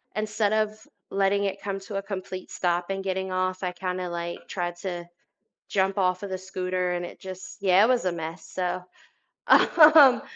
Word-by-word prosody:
instead 215 0 0
of 215 0 -1 0.2
letting 195 +1 +2
it 195 0 -2
come 195 -1 -3
to 195 0 -6
a - - -1
complete 185 -2 -6
stop 175 0 -1
and 195 0 -3
getting 190 0 -2
off, 185 0 -1
I 180 -1 -2
kinda, 180 -1 -3
like, 170 0 -5
tried 175 -2 -3
to 175 -2 -5 0.6
jump 195 -1 +1
off 185 -1 +1
of 200 - -5
the 185 - -3
scooter 185 -1 -2
and 175 0 -2
it - - -12
just 190 +1 -9
yeah, 190 0 +5
it - - +3
was 250 -4 +2
a 180 - +1
mess, 165 +1 -6
so, 180 0 -3 0.6
um, 305 -5 +7
185 Hz, 185 wpm, -26 LUFS, 180-200 Hz, 0.6 s, um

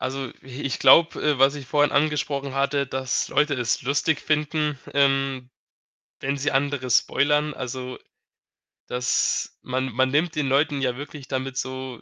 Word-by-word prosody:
Also, 130 -1 -3
i 130 +2 -9
ich 140 - -2
glaube, 165 0 +5
äh, 150 -3 +1
was 135 +2 +5
ich 140 -3 -8
vorhin 145 +3 +2
angesprochen 140 -2 0
hatte, 140 +1 0
dass 130 -1 -2
Leute 150 -1 +2
es 120 -3 -1
lustig 145 +3 0
finden, 150 -1 -1
ähm, 135 -2 +1 0.7
wenn 140 +1 -1
sie 140 - 0
andere 135 -2 -1
spoilern. 150 +5 +2
Also, 125 0 -6 0.9
dass 125 -1 -1
man 130 +1 -2
man 130 +2 +2
nimmt 155 +4 +1
den 150 -2 0
Leuten 145 +1 +1
ja 125 -2 -1
wirklich 145 -1 -9
damit 135 -1 -4
so 130 -1 -5
135 Hz, 155 wpm, -24 LUFS, 130-145 Hz, 0.9 s, glaube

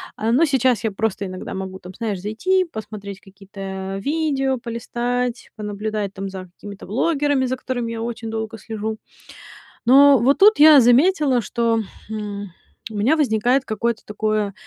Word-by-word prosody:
А, 220 +1 -1
но 280 +8 +4
сейчас 260 -5 +1
я 220 - 0
просто 200 -1 -2
иногда 185 -1 -7
могу, 190 0 -6
там, 180 0 -11
знаешь, 215 -5 -3
зайти, 370 - +1
посмотреть 210 - -8
какие-то 195 0 -7
видео 280 -4 0
полистать, 240 +1 -3
понаблюдать 210 -1 -4
там 195 0 -5
за 190 -1 -7
какими-то 200 -1 -10
блогерами, 285 - +1
за 255 - -1
которыми 245 -3 -3
я 225 -1 -5
очень 230 -1 -5
долго 220 0 -4
слежу. 220 0 -5 0.9
Но 275 +2 +7
вот 260 +5 +2
тут 420 -1 +6
я 300 -2 +9
заметила, 270 +1 +4
что, 230 +1 0 0.3
м, 205 -2 -5 0.4
у 220 - -9
меня 255 +10 +2
возникает 250 0 +2
какое-то 230 0 -2
такое 210 -1 -1
225 Hz, 150 wpm, -21 LUFS, 205-260 Hz, 0.9 s, я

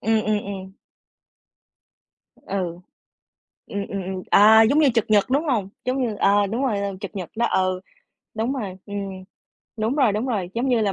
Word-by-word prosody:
ừm, 220 0 +2
ừm, 215 0 +1
ừm. 190 -1 -7 1.6
Ừ. 180 -3 -4 0.9
Ừm, 200 0 -4
ừm, 195 -1 -4
ừm, 185 0 -5
à, 220 +2 +8
giống 275 +7 +3
như 300 - +5
trực 230 - +2
nhật, 205 -2 +5
đúng 285 +5 +2
hông? 230 -10 0 0.2
Giống 260 +1 0
như 215 -3 -4
ờ, 205 0 +3
đúng 230 +7 -2
rồi, 225 -7 0
là 200 0 -2
trực 205 0 -7
nhật 185 -3 -5
đó. 235 - +2
Ừ, 185 -1 0 0.5
đúng 225 +4 -1
rồi, 200 -8 -5
ừm, 195 -2 -6 0.5
đúng 220 +4 0
rồi, 260 -8 +4
đúng 215 +5 -1
rồi. 190 -6 -2
Giống 250 +3 0
như 240 -3 +3
là 205 -2 +1
205 Hz, 185 wpm, -23 LUFS, 195-230 Hz, 1.6 s, à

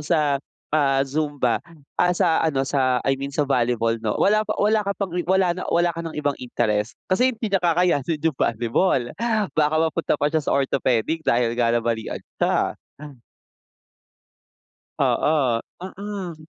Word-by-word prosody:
sa, 150 -3 +1 0.3
ah, 140 -3 +3
zumba, 145 -3 -1 0.4
ah, 180 0 +4
sa 165 -2 +2
ano 140 -4 +1
sa 130 -2 +1
I 135 0 0
mean 140 - -3
sa 145 +1 0
volleyball 120 -4 0
'no, 110 -2 -1
wala 215 +2 +3
pa 215 0 -3
wala 215 +1 +3
ka 200 -1 -3
pang, 195 -4 -3
eh, 180 - -1
wala 190 -2 +3
na 180 +1 -6
o - - +1
wala 175 0 +2
ka 165 - -6
ng 165 -1 -6
ibang 145 -1 0
interest 110 -3 -1 0.2
kasi 250 +7 +4
hindi 235 -2 -4
niya 195 - +3
kakayanin 165 -3 +1
yung 160 -4 +1
volleyball 120 - +1 0.5
baka 155 0 +2
mapunta 160 0 +1
pa 145 +2 0
siya 160 - +2
sa - - -1
orthopedic 135 +2 0
dahil 120 -1 +2
nga 120 0 +1
nabalian 115 -1 -2 0.2
siya. - - +2 2.4
Oo, 135 -7 +2 0.2
mm. 190 -2 -6
150 Hz, 160 wpm, -23 LUFS, 125-175 Hz, 2.4 s, ah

